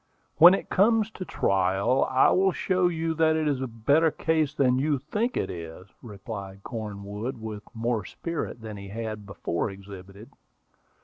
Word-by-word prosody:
"When 175 +4 +9
it - - -6
comes 220 +2 +3
to 185 - -7
trial, 95 - +1
I 130 0 +4
will 190 +1 +3
show 185 -1 +1
you 165 -1 -1
that 160 0 +3
it 155 -1 0
is 140 -3 0
a 130 - -2
better 140 +8 +2
case 155 -1 0
than 130 -3 +2
you 145 +1 +1
think 210 - -2
it - - -1
is," 85 +2 -9
replied 100 -3 -8
Cornwood, 105 +2 -5
with 110 -2 -6
more 115 -1 -1
spirit 165 - -5
than 110 -2 -7
he 100 0 -9
had 110 0 -6
before 100 0 -2
exhibited. 100 +1 -11
120 Hz, 165 wpm, -26 LUFS, 100-160 Hz, -, When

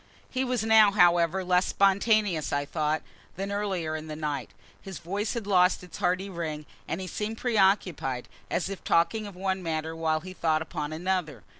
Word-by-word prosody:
He 260 0 0
was 250 -4 -1
now, 220 -1 +7
however, 175 -2 +3
less 180 0 +2
spontaneous, 195 - +2
I 145 0 0
thought, 155 0 -1 0.3
than 195 +2 -4
earlier 190 -6 -2
in 155 0 -6
the 155 - -5
night. 150 -4 -3 0.3
His 195 -2 -8
voice 200 +7 -3
had 230 -3 -3
lost 180 -2 +3
its 180 - -10
hearty 185 +2 0
ring, 160 -5 -5 0.2
and 165 - -3
he 190 - -4
seemed 210 +5 -4
preoccupied, 190 - +1 0.2
as 175 - -1
if 195 -1 -7
talking 170 +6 +2
of 200 - -10
one 190 0 -2
matter 160 -1 -3
while 160 -1 0
he 185 +2 -9
thought 160 -3 +1
upon 150 -1 -5
another. 160 - -2
180 Hz, 180 wpm, -27 LUFS, 155-200 Hz, 0.3 s, now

